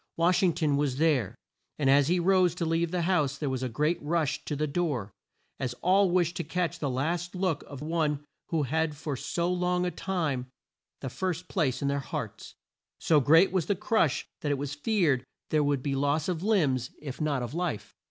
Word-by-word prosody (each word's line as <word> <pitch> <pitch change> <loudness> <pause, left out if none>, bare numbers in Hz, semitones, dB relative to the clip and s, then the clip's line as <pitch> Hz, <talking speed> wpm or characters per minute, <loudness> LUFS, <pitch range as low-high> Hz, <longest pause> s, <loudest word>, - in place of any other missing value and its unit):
Wash 170 +2 +3
ing 180 -3 +3
ton 155 -4 +1
was 140 -3 0
there, 145 - +2 0.4
and 145 - 0
as 140 0 +5
he 180 +1 +2
rose 180 -1 +3
to 175 - -2
leave 165 +1 +1
the 175 0 -1
house 150 -7 +1
there 145 -2 -2
was 130 -1 -2
a 130 - -2
great 150 +9 0
rush 155 -1 0
to 150 - -2
the 150 +2 0
door, 140 - -2 0.5
as 125 -2 -2
all 190 +2 +4
wished 175 -1 +1
to 170 - -2
catch 170 +1 -2
the 145 - -1
last 165 +8 -2
look 180 -5 0
of 140 0 -8
one 150 -2 -1 0.2
who 160 -3 0
had 150 +5 0
had - - -15
for 145 -2 -3
so 170 +7 -1
long 180 0 0
a 180 - -1
time 155 -11 -2 0.5
the 135 - -3
first 180 +1 -3
place 140 - 0
in - - +1
their 140 0 0
hearts. 140 -6 -6 0.4
So 155 -2 +3
great 160 +7 +5
was 180 -4 0
the 200 - +2
crush 190 - +1
that 145 - -1
it 145 - +1
was 140 +1 -4
feared 145 - +1 0.3
there 155 -1 +3
would 145 -3 0
be 140 - -1
loss 145 +2 +1
of 175 -3 -2
limbs 150 - +1
if 140 0 -7
not 145 -4 0
of 120 - -5
life. 170 -10 -3
155 Hz, 210 wpm, -28 LUFS, 140-175 Hz, 0.5 s, as